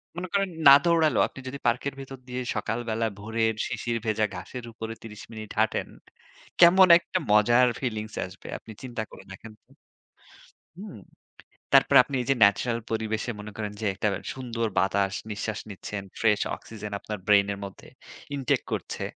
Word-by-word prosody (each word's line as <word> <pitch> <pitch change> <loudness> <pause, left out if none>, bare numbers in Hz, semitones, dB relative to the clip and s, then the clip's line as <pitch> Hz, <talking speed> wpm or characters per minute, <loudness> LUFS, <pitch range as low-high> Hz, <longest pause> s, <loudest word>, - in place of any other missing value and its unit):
মনে 180 +1 -4
করেন 195 -1 +1 0.2
না 140 - +12
দৌড়ালেও 160 -7 +3
আপনি - - -13
যদি 140 +2 -6
পার্কের 125 +4 0
ভেতর 135 0 -8
দিয়ে 125 0 -4
সকাল 115 - -2
বেলা 115 +1 0
ভোরের 110 +1 0
শিশির 120 -1 -2
ভেজা 110 0 +1
ঘাসের 115 +7 -7
উপরে 115 0 -6
৩০ 105 -1 -10
মিনিট 110 -1 -8
হাঁটেন। 110 0 +1 0.7
কেমন 185 +2 +8
একটা 185 - -3
মজার 120 +4 +5
feelings 110 -4 -4
আসবে 95 +2 -12
আপনি 110 - -13
চিন্তা 120 -3 -4
করে - - -12
দেখেন 110 +3 -10
তো! - - -48 1.1
হুম! 195 - -9 0.8
তারপরে 135 0 +6
আপনি 140 +1 -6
এই 125 - -6
যে - - +3
natural 115 +4 +1
পরিবেশে 110 +1 -2
মনে 105 0 -8
করেন 105 -1 -4
যে - - -2
একটা 105 - -1 0.3
সুন্দর 115 -3 -3
বাতাস 95 +1 +1 0.2
নিঃশ্বাস 105 +1 -3
নিচ্ছেন, 100 0 -6 0.2
fresh 105 -2 +3
oxygen 105 -2 -9
আপনার 105 +1 -6
brain 100 -1 +6
এর 100 - -8
মধ্যে 95 - -11 0.5
intake 135 -3 0
করছে। - - -4
110 Hz, 165 wpm, -26 LUFS, 105-130 Hz, 1.1 s, না